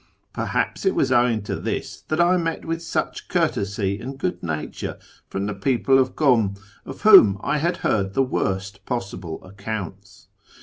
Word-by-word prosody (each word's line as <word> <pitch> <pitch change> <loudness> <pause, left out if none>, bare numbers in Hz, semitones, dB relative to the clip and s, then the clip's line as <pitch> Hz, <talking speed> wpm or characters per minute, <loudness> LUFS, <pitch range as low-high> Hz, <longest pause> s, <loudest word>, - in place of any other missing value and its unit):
Perhaps - - -2
it 385 - +2
was 130 - +1
owing 120 -4 +3
to - - -3
this - - -4
tliat 155 - 0
I 175 +2 +5
met 165 -2 -2
with 165 0 -3
such 165 - -3
courtesy 105 - 0
and 135 +3 -7
good 180 +6 -2
nature 80 -3 -4 0.3
from 95 +1 -3
the 105 - -2
people 130 +6 +2
of 130 -1 +1
Kum, 115 -9 +3 0.3
of 135 - -8
whom 190 - +8
I 150 - 0
had 170 +4 0
heard 100 -2 0
the 135 - +4
worst 95 -5 -2
possible 95 -8 -4
accounts. 100 0 -7
115 Hz, 165 wpm, -23 LUFS, 100-150 Hz, 0.3 s, whom